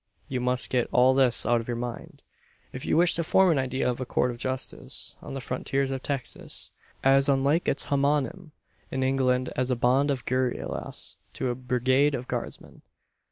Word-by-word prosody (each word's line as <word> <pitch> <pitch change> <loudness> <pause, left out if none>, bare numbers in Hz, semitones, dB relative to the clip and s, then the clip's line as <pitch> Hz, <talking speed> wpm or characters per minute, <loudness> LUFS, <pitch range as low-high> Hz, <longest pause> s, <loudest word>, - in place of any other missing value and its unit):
You 130 -2 -3
must 125 0 +1
get 125 -2 +1
all 125 +1 +5
this 130 -3 +4
out 120 -1 +2
of 115 - -11
your 120 -1 -2
mind, 120 0 -7 0.5
if 130 - -6
you - - +2
wish 175 +1 +5
to 170 - 0
form 185 +3 +4
an 150 - +2
idea 130 0 -1
of 125 0 -2
a - - -2
Court 125 - +1
of 120 - -9
justice 130 +1 -1
on - - -8
the - - -3
frontiers 135 +2 -2
of 135 -1 -3
Texas 140 -2 -4 0.3
as 135 +1 +4
unlike 140 +5 +2
its 140 - 0
homonym 145 +5 0 0.4
in 130 0 -2
England 130 -1 +1
as 130 0 -1
a 125 - +2
bond 130 +4 +2
of 135 -3 -2
guerillas 130 -1 -1 0.2
to 130 - -2
a - - 0
brigade 130 +3 +1
of 125 0 -6
Guardsmen. - - -6
130 Hz, 190 wpm, -26 LUFS, 125-140 Hz, 0.5 s, all